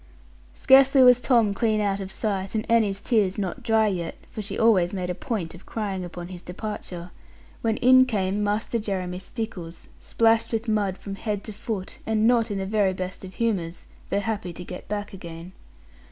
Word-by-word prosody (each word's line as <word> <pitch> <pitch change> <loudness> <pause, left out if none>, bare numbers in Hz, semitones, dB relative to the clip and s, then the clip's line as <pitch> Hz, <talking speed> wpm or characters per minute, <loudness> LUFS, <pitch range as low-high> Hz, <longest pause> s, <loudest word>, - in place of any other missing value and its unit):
Scarcely 270 0 +6
was 250 -1 +7
Tom 230 -6 +3
clean 220 0 +1
out 200 -1 0
of 190 -1 -6
sight, 195 -1 -2
and 215 - -1
Annie's 215 -4 +2
tears 205 -6 +1
not 195 -3 -3
dry 220 -1 +3
yet 180 -5 -2 0.2
(for 215 - -5
she 200 -1 -5
always 200 -5 +3
made 180 -1 -2
a - - -1
point 190 -5 -4
of 175 - -14
crying 200 -4 -3
upon 175 0 -7
his 180 -2 -8
departure), 180 -2 -7 0.5
when 225 -1 0
in 255 +1 +6
came 205 -3 0
Master 210 +3 0
Jeremy 185 -4 -3
Stickles, 190 -6 -6
splashed 225 0 +2
with 225 0 -2
mud 205 -3 0
from 200 - -7
head 205 0 -3
to 215 - -7
foot, 210 -3 -5
and 220 0 +1
not 235 -1 +3
in 205 - -2
the 190 - -2
very 200 -1 +2
best 185 0 -6
of 190 0 -9
humours, 185 -8 -2 0.2
though 200 - +1
happy 205 -5 -3
to 180 - -8
get 180 0 -9
back 205 -1 -4
again. 170 -1 -9
205 Hz, 190 wpm, -25 LUFS, 185-225 Hz, 0.5 s, was